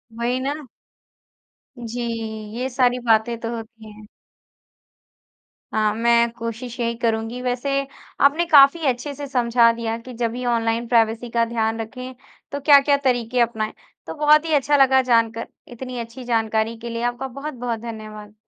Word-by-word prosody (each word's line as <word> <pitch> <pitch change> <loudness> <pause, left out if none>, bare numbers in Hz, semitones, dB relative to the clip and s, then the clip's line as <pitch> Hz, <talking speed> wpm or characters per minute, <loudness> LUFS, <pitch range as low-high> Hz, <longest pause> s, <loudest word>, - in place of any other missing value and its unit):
वही 240 +2 -1
ना। 285 +2 -4 1.1
जी। 240 0 -5 0.6
ये 255 +2 -2
सारी 250 -1 +2
बातें 225 +1 +3
तो 230 0 -4
होती 225 -1 -10
हैं। 210 0 -14 1.7
हाँ। 215 -1 +1
मैं 235 +1 +3
कोशिश 235 +1 -6
यही 235 -1 -1
करूँगी। 230 +1 -2
वैसे 250 +2 -2 0.6
आपने 305 +5 +3
काफ़ी 300 0 +6
अच्छे 260 +3 -1
से 285 +1 -6
समझा 235 -3 +3
दिया 230 -1 -3
कि 250 +2 -11
जब 230 -1 -2
भी 250 +2 -5
ऑनलाइन 230 0 0
प्राइवेसी 230 0 +1
का 230 0 +1
ध्यान 225 -1 -1
रखें, 255 +3 -8 0.4
तो 285 - -3
क्या-क्या 285 0 +5
तरीके 245 -1 0
अपनाएँ। 220 -2 -1 0.3
तो - - -5
बहुत 300 +1 +4
ही 320 - -1
अच्छा 290 0 +3
लगा 265 -1 +5
जानकर 230 -2 +1 0.2
इतनी 250 0 -7
अच्छी 235 +2 -8
जानकारी 225 -1 0
के 235 +1 -7
लिए 230 0 -4
आपका 245 +2 -2
बहुत-बहुत 245 -3 -5
धन्यवाद। 215 -2 -9
235 Hz, 155 wpm, -22 LUFS, 230-255 Hz, 1.7 s, काफ़ी